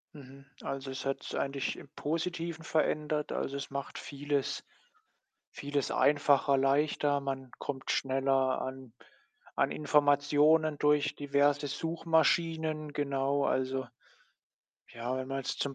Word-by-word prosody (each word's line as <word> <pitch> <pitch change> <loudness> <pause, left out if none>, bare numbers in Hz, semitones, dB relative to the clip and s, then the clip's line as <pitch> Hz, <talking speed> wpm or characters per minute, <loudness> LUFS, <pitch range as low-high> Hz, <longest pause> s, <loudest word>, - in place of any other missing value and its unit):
Mhm. 135 -1 -13 0.2
Also, 135 -1 -4
es 130 - -6
hat's 135 0 -3
eigentlich 140 0 -1
im 140 - -12
Positiven 165 +1 -3
verändert. 150 -1 0
Also, 140 +1 -2
es 140 - -5
macht 140 0 -5
vieles 145 -1 -2 0.9
vieles 145 -1 -2
einfacher, 145 -1 +4
leichter. 145 +1 +2
Man 135 -2 -4
kommt 135 -2 -3
schneller 135 0 +1
an 130 -2 -7 0.6
an - - +2
Informationen 150 +1 +3
durch 150 0 +2
diverse 145 0 +2
Suchmaschinen. 160 0 0
Genau, 140 0 0
also, 130 0 0 1.0
ja, 120 +2 -4
wenn 130 0 -4
man 135 0 -2
jetzt 135 - -4
zum 140 -1 -1
140 Hz, 120 wpm, -31 LUFS, 135-150 Hz, 1.0 s, einfacher